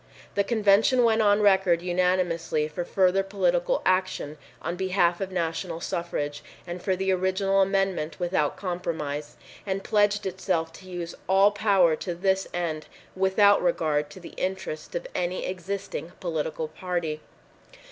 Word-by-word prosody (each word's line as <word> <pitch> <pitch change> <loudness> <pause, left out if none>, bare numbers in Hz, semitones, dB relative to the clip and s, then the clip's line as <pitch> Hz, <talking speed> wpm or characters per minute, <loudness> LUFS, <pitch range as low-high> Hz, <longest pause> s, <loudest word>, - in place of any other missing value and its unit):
The 200 - +2
convention 220 +3 +4
went 225 -1 +4
on 205 0 +4
record 190 -4 +4
unanimously 175 -3 +1
for 155 +3 -4
further 190 +1 +2
political - - 0
action 185 -5 0 0.2
on 170 +3 -3
behalf 185 -1 +1
of 190 -1 -3
national 165 -1 -2
suffrage 170 -5 -3 0.2
and 175 0 -6
for 190 0 0
the 190 +1 0
original 190 +1 +2
amendment 195 -5 0
without 175 -4 0
compromise, 160 -6 -4 0.3
and 195 -1 -3
pledged 205 -1 +2
itself 180 -3 -1
to 185 +2 -13
use 175 -2 -5 0.2
all 195 +2 +5
power 195 -6 +3
to 175 -3 -4
this 190 +2 +1
end 160 -3 -3 0.3
without 190 +2 +4
regard 155 -4 +1
to 165 - -11
the 175 - -11
interests 185 - -4
of - - -3
any 180 +1 -2
existing 190 -1 -5
political 160 -2 -2
party. 160 -1 -3
185 Hz, 140 wpm, -26 LUFS, 170-195 Hz, 0.3 s, all